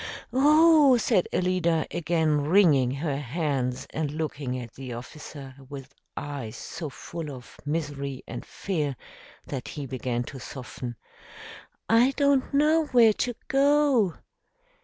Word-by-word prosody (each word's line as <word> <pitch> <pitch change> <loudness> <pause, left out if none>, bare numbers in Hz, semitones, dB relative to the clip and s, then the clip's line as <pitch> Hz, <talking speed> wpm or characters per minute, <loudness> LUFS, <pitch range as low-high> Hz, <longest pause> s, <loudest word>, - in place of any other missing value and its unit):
"Oh!" 300 0 +6
said 190 -5 +2
Alida, 175 -3 +1
again 160 -3 +1
wringing 155 -7 +5
her 140 +2 -2
hands 135 -3 -2
and 155 -2 -2
looking 145 -4 -3
at 120 -3 -8
the 130 -2 -7
officer 135 +2 -9 0.2
with 135 -1 -9 0.2
eyes 140 -7 -5
so 155 - -6
full 165 +2 -7
of 130 -4 -10
misery 145 -4 -3
and - - -6
fear 150 -8 -3 0.5
that 135 -3 -5
he 145 -2 -6
began 125 -2 -2
to 135 +2 -9
soften, 125 -1 -7 0.9
"I 240 +4 +4
don't 280 -2 +2
know 305 +2 +3
where 235 -5 +6
to 245 +3 -2
go." 275 - +3
155 Hz, 125 wpm, -26 LUFS, 135-225 Hz, 0.9 s, Oh